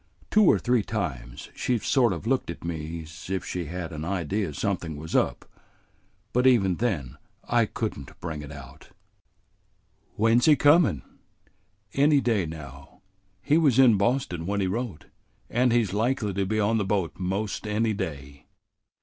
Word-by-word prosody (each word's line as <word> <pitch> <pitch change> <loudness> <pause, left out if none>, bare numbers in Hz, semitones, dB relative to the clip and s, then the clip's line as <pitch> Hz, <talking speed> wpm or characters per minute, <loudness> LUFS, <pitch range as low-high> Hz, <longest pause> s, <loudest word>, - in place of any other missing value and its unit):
Two 215 -1 +5
or - - +6
three 125 -2 +1
times 65 - -5
she's 120 -3 -1
sort 125 -5 +3
of 90 +2 -5
looked 130 -3 0
at 85 - -7
me 80 0 -5
's 80 +3 -11
if 95 -2 -2
she 90 -2 -4
had 85 +2 -5
an 75 0 -5
idea 95 +1 -2
something 85 0 -3
was 80 +2 -6
up, - - +1 0.9
but 125 +1 +3
even 95 -8 +3
then 75 - -2 0.3
I 120 -2 +2
could 110 0 -3
n't 70 - -12
bring 80 -3 -5
it 70 -1 -9
out." 70 -3 -12 1.3
"When 115 +3 +3
's - - +2
he 155 - +7
comin'?" 145 - +4 0.9
"Any 145 +1 +4
day 110 -9 +1
now. 70 -4 -10 0.4
He 150 +3 +3
was 140 -7 +3
in 130 -4 +7
Boston 100 -7 0
when 100 +1 -1
he 95 - +1
wrote, 100 -2 -3 0.5
and 125 +1 +2
he's 115 -5 +1
likely 110 -1 0
to 100 0 -1
be 110 +2 0
on 110 +2 +2
the - - +1
boat 95 -3 -1
'most 100 +4 -2
any 110 +1 +1
day." 70 -8 -6
100 Hz, 165 wpm, -26 LUFS, 80-120 Hz, 1.3 s, he